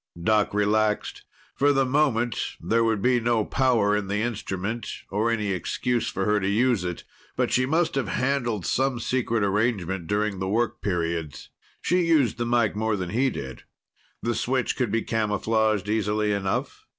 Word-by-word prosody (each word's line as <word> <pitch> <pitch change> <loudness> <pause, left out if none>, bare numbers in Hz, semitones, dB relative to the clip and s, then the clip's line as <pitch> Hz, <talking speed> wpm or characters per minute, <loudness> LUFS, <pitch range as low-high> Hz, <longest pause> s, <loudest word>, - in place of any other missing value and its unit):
Doc 105 +4 +2
relaxed. 105 +1 0 0.3
For 145 +1 +3
the 135 -1 +2
moment, 125 -4 0
there 115 +1 +1
would 110 -3 0
be 125 -1 +3
no 115 -2 +1
power 120 -6 +2
in 105 -2 -2
the 105 +2 -1
instrument, 110 -1 -3 0.2
nor 105 +4 +1
any 105 -3 0
excuse 120 +6 -1
for - - -2
her 105 0 +2
to 95 - -2
use 115 -1 +2
it. 90 -2 -4 0.3
But - - 0
she 130 0 +2
must 160 +4 +1
have 135 -6 -1
handled 120 -2 -1
some 130 -1 0
secret 115 -2 0
arrangement 95 -4 0
during 105 0 -1
the 95 0 -2
work 115 +3 0
periods. 85 -5 -3 0.3
She 180 +1 +2
used 155 -10 +2
the 120 - -1
mike 120 -4 +2
more 110 0 0
than 90 -3 -4
he 130 +5 +2
did. 65 - -7 0.6
The 120 - 0
switch 125 +3 0
could 125 -4 0
be 115 +1 0
camouflaged 110 -1 0
easily 105 0 0
enough. 100 -2 -2
110 Hz, 170 wpm, -25 LUFS, 100-120 Hz, 0.6 s, For